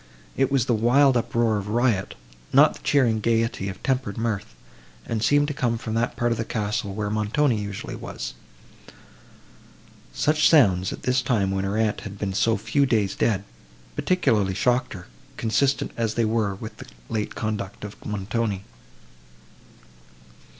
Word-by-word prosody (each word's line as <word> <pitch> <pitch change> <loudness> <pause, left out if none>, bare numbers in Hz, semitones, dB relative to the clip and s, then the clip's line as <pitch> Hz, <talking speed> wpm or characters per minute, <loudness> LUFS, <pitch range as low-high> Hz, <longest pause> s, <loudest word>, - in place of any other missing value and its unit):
It 135 0 +1
was 135 -4 +2
the 120 - +1
wild 125 +5 +4
uproar 115 -2 +1
of 100 - -7
riot, 115 -3 +1 0.4
not - - +6
the - - -12
cheering 120 -6 +2
gaiety 115 -3 0
of 95 - -9
tempered 130 -6 -1
mirth; 110 -3 -3 0.5
and 110 -2 -2
seemed 145 +4 +3
to - - -2
come 120 -4 0
from 110 -1 -5
that 115 +1 0
part 120 0 0
of 115 - -1
the - - 0
castle, 105 -3 -2
where 105 -1 -2
Montoni 110 +3 +1
usually 100 -1 -6
was. - - -6 1.8
Such 155 +1 +3
sounds, 95 - +4
at - - -8
this 125 +1 +2
time, 110 -6 +1
when 95 0 -1
her 100 +2 -1
aunt 110 -2 0
had 100 0 -8
been 100 -1 -3
so 115 +3 +2
few 115 +7 +1
days 105 -5 +1
dead, 100 -4 +1 0.5
particularly 105 - +1
shocked 125 +5 +1
her, 90 -4 -9 0.3
consistent 125 +5 +1
as 115 -2 -1
they 115 - +2
were 110 -3 0
with 110 +3 -9
the - - -10 0.2
late 105 -2 -3
conduct 105 -3 -4
of 105 -1 -9
Montoni. 105 0 -2
110 Hz, 160 wpm, -24 LUFS, 100-120 Hz, 1.8 s, not